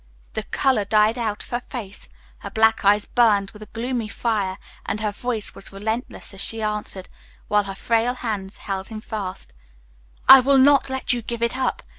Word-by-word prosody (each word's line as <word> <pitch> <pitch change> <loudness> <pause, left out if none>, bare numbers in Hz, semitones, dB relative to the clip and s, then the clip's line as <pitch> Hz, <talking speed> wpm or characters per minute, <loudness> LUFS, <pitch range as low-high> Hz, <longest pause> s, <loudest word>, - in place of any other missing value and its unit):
The - - -2
color 260 -6 +1
died 215 +3 +3
out 215 -3 -2
of - - -15
her 240 - 0
face, 220 -5 -8 0.3
her - - -7
black 220 0 +3
eyes 205 +1 +4
burned 210 -5 +3
with 210 - -14
a 215 - -9
gloomy 235 0 -3
fire, 210 -4 -1 0.3
and - - -3
her 215 -1 -1
voice 225 0 -4
was - - -10
relentless 220 +4 -4
as 195 - -3
she 225 +1 0
answered, 210 -3 -3 0.4
while 210 -1 +3
her 195 -1 -6
frail 230 +4 +1
hands 200 -5 -4
held 195 -1 -4
him 220 -1 -7
fast, 195 - -6 0.7
"I 265 - +12
will 275 +2 +4
not 275 +1 +5
let 265 -1 -1
you 240 - -2
give 235 +1 -4
it 235 +1 0
up. 260 0 -1
220 Hz, 190 wpm, -23 LUFS, 205-240 Hz, 0.7 s, I